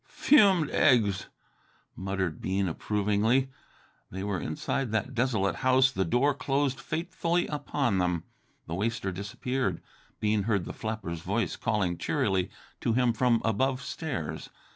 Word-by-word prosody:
"Fumed 195 Hz, -, +4 dB
eggs!" 105 Hz, -, +3 dB, 0.7 s
murmured 95 Hz, -3 st, -3 dB
Bean 95 Hz, +1 st, 0 dB
approvingly. 105 Hz, +8 st, +1 dB, 0.6 s
They 95 Hz, +1 st, -5 dB
were 100 Hz, -2 st, -1 dB
inside 115 Hz, +9 st, -2 dB
that 110 Hz, +4 st, -1 dB
desolated 115 Hz, -6 st, +1 dB
house, 130 Hz, +1 st, +4 dB
the 95 Hz, -6 st, 0 dB
door 125 Hz, -, +2 dB
closed 135 Hz, -1 st, 0 dB
fatefully 170 Hz, +4 st, -1 dB
upon 140 Hz, -8 st, -1 dB
them. 90 Hz, -2 st, 0 dB, 0.4 s
The 80 Hz, -, -6 dB
waster 100 Hz, +1 st, -1 dB
disappeared. 105 Hz, +7 st, -2 dB, 0.4 s
Bean 105 Hz, -1 st, +1 dB
heard 100 Hz, -5 st, +1 dB
the -, -, -6 dB
flapper's 110 Hz, -7 st, -4 dB
voice -, -, -1 dB
calling 95 Hz, -6 st, -1 dB
cheerily 100 Hz, -, 0 dB, 0.3 s
to 115 Hz, -, 0 dB
him 125 Hz, 0 st, +3 dB
from 115 Hz, 0 st, +2 dB
above 130 Hz, +5 st, +1 dB
stairs. 140 Hz, -, -4 dB
115 Hz, 130 wpm, -28 LUFS, 95-135 Hz, 0.7 s, Fumed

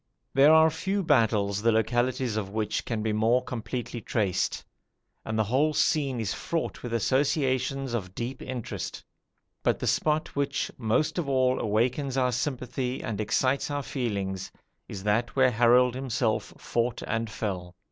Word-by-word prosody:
There 140 Hz, +3 st, +6 dB
are 160 Hz, 0 st, +6 dB
few 195 Hz, +5 st, -1 dB
battles 110 Hz, -, +2 dB
the 115 Hz, +1 st, +4 dB
localities 120 Hz, +1 st, +1 dB
of 105 Hz, -3 st, -2 dB
which 105 Hz, 0 st, -2 dB
can 110 Hz, -3 st, -2 dB
be 110 Hz, -1 st, 0 dB
more 115 Hz, +4 st, +3 dB
completely 120 Hz, 0 st, -5 dB
traced; 100 Hz, -3 st, -1 dB, 0.6 s
and 110 Hz, 0 st, -3 dB
the 110 Hz, -, +3 dB
whole 140 Hz, +8 st, +1 dB
scene 140 Hz, -5 st, +1 dB
is 110 Hz, -4 st, -1 dB
fraught 165 Hz, -1 st, -3 dB
with 120 Hz, -, -6 dB
associations 130 Hz, -, +1 dB
of 95 Hz, -5 st, -4 dB
deep 125 Hz, +2 st, -4 dB
interest: 125 Hz, -3 st, -5 dB, 0.6 s
but -, -, +2 dB
the -, -, -4 dB
spot 155 Hz, 0 st, +1 dB
which, 140 Hz, 0 st, -1 dB
most 120 Hz, +9 st, +1 dB
of 155 Hz, -5 st, -2 dB
all, 130 Hz, -1 st, +2 dB
awakens 125 Hz, +5 st, 0 dB
our 125 Hz, -1 st, +2 dB
sympathy 125 Hz, 0 st, -2 dB
and 110 Hz, -1 st, -3 dB
excites 130 Hz, +7 st, +1 dB
our 145 Hz, -1 st, -2 dB
feelings, 100 Hz, -8 st, -3 dB, 0.4 s
is 95 Hz, -2 st, -7 dB
that 115 Hz, +4 st, 0 dB
where 130 Hz, -2 st, +5 dB
Harold 120 Hz, +2 st, +4 dB
himself 125 Hz, -4 st, -1 dB
fought 120 Hz, 0 st, -1 dB
and 115 Hz, 0 st, -2 dB
fell. 90 Hz, -5 st, -4 dB
125 Hz, 155 wpm, -27 LUFS, 110-135 Hz, 0.6 s, There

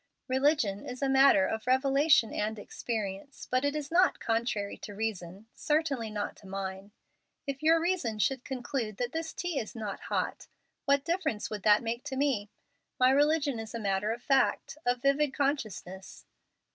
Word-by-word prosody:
Religion 260 Hz, -6 st, +1 dB
is 250 Hz, +2 st, -6 dB
a -, -, +3 dB
matter 270 Hz, -7 st, +6 dB
of 220 Hz, +3 st, -3 dB
revelation 275 Hz, -1 st, +4 dB
and 215 Hz, +1 st, -2 dB
experience. 210 Hz, +2 st, -5 dB
But 255 Hz, +1 st, +1 dB
it 285 Hz, +1 st, 0 dB
is 295 Hz, -1 st, -4 dB
not 365 Hz, +2 st, +4 dB
contrary 225 Hz, -3 st, -1 dB
to 205 Hz, -, -8 dB
reason, 200 Hz, -2 st, -4 dB
certainly 295 Hz, -7 st, 0 dB
not 210 Hz, -1 st, -4 dB
to 200 Hz, -, -14 dB
mine. 195 Hz, 0 st, -5 dB, 0.6 s
If 275 Hz, -2 st, -4 dB
your 325 Hz, +2 st, +5 dB
reason 335 Hz, -11 st, -1 dB
should 260 Hz, +4 st, 0 dB
conclude 245 Hz, -4 st, -4 dB
that 245 Hz, 0 st, -2 dB
this 320 Hz, +1 st, -3 dB
tea 350 Hz, -5 st, -2 dB
is 220 Hz, -, -6 dB
not 215 Hz, -3 st, -5 dB
hot, -, -, -3 dB, 0.4 s
what 280 Hz, 0 st, +3 dB
difference 335 Hz, -, -1 dB
would 210 Hz, -2 st, -4 dB
that 210 Hz, +3 st, +5 dB
make 235 Hz, +2 st, -3 dB
to 270 Hz, -2 st, -4 dB
me? 260 Hz, -8 st, 0 dB, 0.5 s
My 255 Hz, 0 st, +6 dB
religion 290 Hz, -2 st, +2 dB
is 225 Hz, +1 st, -7 dB
a -, -, -3 dB
matter 200 Hz, 0 st, 0 dB
of 235 Hz, +1 st, -5 dB
fact, 270 Hz, -1 st, +2 dB
of 245 Hz, 0 st, +1 dB
vivid 280 Hz, 0 st, +2 dB
consciousness." 215 Hz, -, -3 dB
245 Hz, 170 wpm, -30 LUFS, 210-280 Hz, 0.6 s, matter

